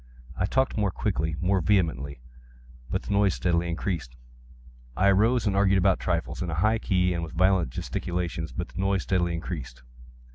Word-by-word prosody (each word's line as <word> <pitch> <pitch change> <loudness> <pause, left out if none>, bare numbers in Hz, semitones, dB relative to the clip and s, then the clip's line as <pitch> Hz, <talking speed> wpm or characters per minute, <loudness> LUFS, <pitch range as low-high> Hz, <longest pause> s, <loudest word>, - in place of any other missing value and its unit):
I 90 -1 0
talked 130 +4 +1
more 105 -2 +2
quickly—more 85 +3 0
vehemently; 75 -8 0 0.7
but - - -2
the - - -5
noise 100 -1 +3
steadily 85 -1 0
increased. 85 -6 -3 0.8
I 100 +1 +4
arose 115 +6 +3
and 100 -2 +1
argued 100 -1 +4
about 95 0 +3
trifles, 85 -1 -2
in 90 - -2
a 80 - -2
high 110 +7 +2
key 90 -4 +1
and 85 - -2
with 80 - -7
violent 90 -3 +3
gesticulations; 85 +4 -3
but 90 - -5
the - - -9
noise 95 -1 +1
steadily 85 -2 0
increased. 75 -8 -6
90 Hz, 170 wpm, -26 LUFS, 85-100 Hz, 0.8 s, I